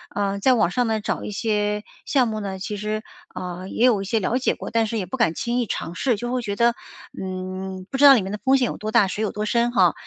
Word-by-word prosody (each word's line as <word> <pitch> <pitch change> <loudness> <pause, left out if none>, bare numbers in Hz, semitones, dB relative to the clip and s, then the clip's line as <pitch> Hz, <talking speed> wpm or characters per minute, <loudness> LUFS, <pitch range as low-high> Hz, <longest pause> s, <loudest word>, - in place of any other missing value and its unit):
呃， 200 -1 -1
在 260 +5 +4
网 200 -6 +2
上 245 +1 +1
呢 220 -1 0
找 - - -2
一 - - -5
些 210 0 -1 0.2
项 255 -4 +3
目 215 -1 -3
呢 195 -2 -4
其 205 +2 -5
实， 215 +1 -3 0.3
呃， 180 +1 -6
也 240 - +2
有 220 -6 +4
一 - - -5
些 225 +2 +1
了 230 +6 0
解 260 - +1
过， - - -7
但 225 -1 +2
是 225 - -3
也 190 - -2
不 225 +9 -5
敢 200 -9 +2
轻 240 +7 -1
易 240 - +1
尝 170 0 -4
试， 250 -4 +1
就 240 +4 -4
会 255 -1 0
觉 200 -3 -3
得， 235 +1 +3 0.5
嗯， 185 0 -5
不 270 - -1
知 285 - +6
道 275 - +11
里 235 - +4
面 190 +1 -5
的 210 - -4
风 265 0 +4
险 255 - +2
有 - - -4
多 215 +1 -4
大、 215 -4 +5
水 205 +3 -4
有 210 - -1
多 210 0 -3
深 235 +2 +1
哈。 - - +4
215 Hz, 305 characters per minute, -23 LUFS, 195-235 Hz, 0.5 s, 道